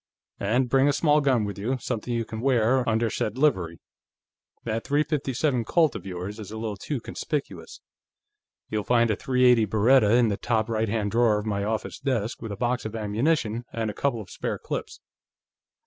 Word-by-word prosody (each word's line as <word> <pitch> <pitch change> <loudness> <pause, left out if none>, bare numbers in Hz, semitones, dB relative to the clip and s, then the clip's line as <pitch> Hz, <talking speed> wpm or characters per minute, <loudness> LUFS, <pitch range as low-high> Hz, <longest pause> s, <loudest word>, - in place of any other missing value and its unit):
And 120 +6 +1
bring 135 +2 +3
a 145 - +3
small 150 +1 +3
gun 130 -5 +2
with 100 0 -5
you; 125 +6 -1
something 120 -1 -4
you 115 -1 -1
can 110 0 -6
wear 125 -1 +2
under 115 +1 +1
said 110 +3 -2
livery. 95 - +1 0.8
That 115 0 -2
.357 145 -3 0
Colt 165 -4 +3
of 95 - -7
yours 95 +4 -6
is 105 - -8
a 110 - -7
little 110 -2 -3
too 135 +7 -4
conspicuous. 105 - -5 0.9
You'll 105 -1 -2
find 120 -1 +3
a - - +1
.380 125 -3 +3
Beretta 110 +1 +4
in 120 -2 +4
the 100 - -1
top 110 -2 0
right 110 -1 0
hand 105 -2 -1
drawer 115 -2 +3
of 105 - -4
my 100 -2 -1
office 110 +1 -3
desk, 125 -6 -2
with 115 -2 -6
a 100 - -5
box 125 +1 -1
of 110 0 -5
ammunition 115 +2 0
and 110 -2 -2
a - - -11
couple 120 -3 -1
of 100 - -12
spare - - -3
clips." - - -6
115 Hz, 190 wpm, -26 LUFS, 105-130 Hz, 0.9 s, Beretta